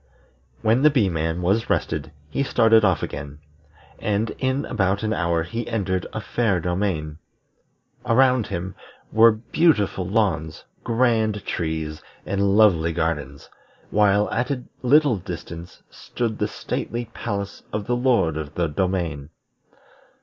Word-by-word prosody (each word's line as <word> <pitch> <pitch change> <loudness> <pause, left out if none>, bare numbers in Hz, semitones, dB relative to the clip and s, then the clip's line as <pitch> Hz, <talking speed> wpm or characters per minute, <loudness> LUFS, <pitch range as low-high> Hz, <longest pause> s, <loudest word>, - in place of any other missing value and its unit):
'" - - -35
When 115 +3 +3
the 150 - +7
Bee 125 -10 +2
man 80 +1 -2
was 100 +6 +1
rested 75 - -1 0.2
he - - -1
started 115 -4 +4
off 95 -7 +2
again, 70 0 -6 0.6
and 105 +1 0
in 130 +2 0
about 100 -3 0
an 110 0 0
hour 85 -4 0
he 115 +8 -5
entered 95 -5 -1
a - - -4
fair 105 -1 0
domain. 85 -4 -2 0.8
Around 125 -1 +3
him 90 +2 -4 0.4
were 115 +1 +7
beautiful 110 - +1
lawns, 85 -8 0 0.2
grand 115 -3 +1
trees, 80 -2 -3 0.2
and 100 +1 +1
lovely 85 -7 +4
gardens; 75 -4 -3 0.4
while 105 0 +3
at 120 +4 -1
a 130 -3 -2 0.2
little 140 -2 +4
distance 85 -2 -8
stood 115 -3 -4
the - - +1
stately 120 +1 -4
palace 100 -3 -4
of 105 -1 -3
the 120 - 0
Lord 120 - +2
of 75 -1 -6
the 85 - +1
Domain. 85 -4 -2
100 Hz, 135 wpm, -23 LUFS, 85-115 Hz, 0.8 s, the